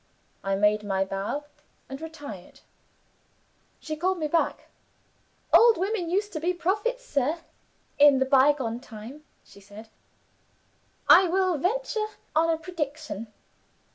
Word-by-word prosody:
I 195 0 0
made 210 +1 +2
my 195 -1 0
bow, 195 +9 -4 0.4
and 270 +2 -8
retired. 290 - -10 1.2
She 310 - -5
called 370 +4 0
me 310 -3 -2
back. 330 +2 0 0.9
'Old 465 -2 +7
women 380 -2 -2
used 410 +4 -1
to 310 - -3
be 355 +3 -1
prophets, 425 +8 -1
sir, 300 - -1 0.6
in 285 -1 +7
the 265 - +2
bygone 265 -3 +3
time,' 240 +6 -11 0.2
she 200 - -18
said. 205 +3 -13 1.2
'I 375 - +8
will 370 -1 +1
venture 435 - -1 0.3
on 325 +1 +3
a 325 - +2
prediction. 300 - -5
305 Hz, 125 wpm, -26 LUFS, 230-365 Hz, 1.2 s, I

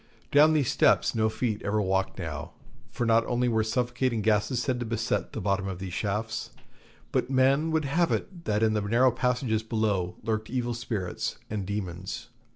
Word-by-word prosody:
Down 150 +2 +6
these 145 -5 +2
steps - - +3
no 110 -1 +2
feet 110 -1 -2
ever 105 +1 0
walked 95 -1 0
now, - - -5 0.4
for 120 - -2
not 115 0 +4
only 125 0 +1
were 110 -2 +2
suffocating 120 0 0
gases 105 +2 +2
said 125 0 -1
to 120 - -3
beset 115 0 -1
the - - -3
bottom 100 -1 0
of 95 -2 -4
the 95 0 -6
shafts, 105 +4 -2 0.6
but 120 - 0
men 135 +4 +3
would 160 -2 +1
have 165 +5 +1
it 175 -3 -3
that 105 +1 +1
in 110 -1 +3
the 105 - +1
narrow 120 +5 +3
passages 125 -2 0
below 110 -5 -1
lurked 110 -1 -2
evil 120 -1 -1
spirits 110 -6 -3
and 100 -4 -3
demons. 95 0 -5
110 Hz, 180 wpm, -28 LUFS, 105-125 Hz, 0.6 s, Down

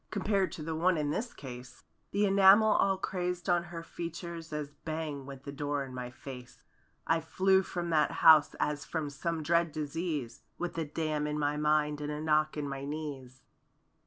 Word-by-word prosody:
Compared 200 -1 0
to 155 - -6
the 160 +1 -3
one 175 +2 +2
in 145 -1 0
this 235 +9 -2
case. 125 -2 -10 0.3
The 205 +1 +2
enamel 200 +2 +7
all 195 -2 +3
crazed 180 -2 -3
on 175 -1 +2
her 170 -1 -7
features 170 -1 -6
As 150 -1 -4
bang 150 -2 -5
went 135 -1 -9
the 140 - -6
door 145 0 -2
in 130 - -10
my 125 -1 -5
face. 125 0 -11 0.4
I 165 0 +2
flew 190 +4 +3
from 175 -2 -4
that 155 -2 +3 0.2
house 155 -2 +8
as 150 -1 -1
from 150 -2 -3
some 165 +2 -3
dread 170 +1 +2
disease. 150 -4 -3 0.2
With 175 -1 -4
a 160 - -1
dam 150 0 -2
in 150 0 -2
my 145 0 0
mind 150 0 +1
and 150 0 -3
a 150 - -4
knock 155 0 +1
in 145 -1 -2
my 135 0 -5
knees. 140 -3 -6
155 Hz, 190 wpm, -31 LUFS, 145-170 Hz, 0.4 s, house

